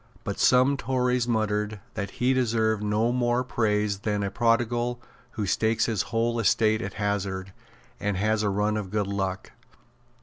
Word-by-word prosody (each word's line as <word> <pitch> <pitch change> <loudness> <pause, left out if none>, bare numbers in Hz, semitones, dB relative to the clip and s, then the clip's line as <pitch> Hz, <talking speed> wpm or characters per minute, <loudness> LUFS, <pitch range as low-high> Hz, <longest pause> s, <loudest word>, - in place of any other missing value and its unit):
But 100 -3 -4
some 130 +2 +4
Tories 125 -2 0
muttered 105 -2 -1
that 100 -2 -4
he 125 +2 +2
deserved 110 -4 +1
no 105 +3 +1
more 120 0 +1
praise 105 -5 0
than 105 0 -1
a 100 - -2
prodigal 120 +2 +1 0.3
who 105 - -2
stakes 110 +4 +1
his 110 -4 0
whole 115 +1 0
estate 110 +1 +2
at - - -5
hazard, 100 -2 -2 0.5
and 105 -2 -1
has 110 +2 +1
a 105 - +1
run 105 +2 0
of 100 -3 -4
good 105 +1 0
luck. 95 -1 -3
110 Hz, 160 wpm, -26 LUFS, 105-120 Hz, 0.5 s, some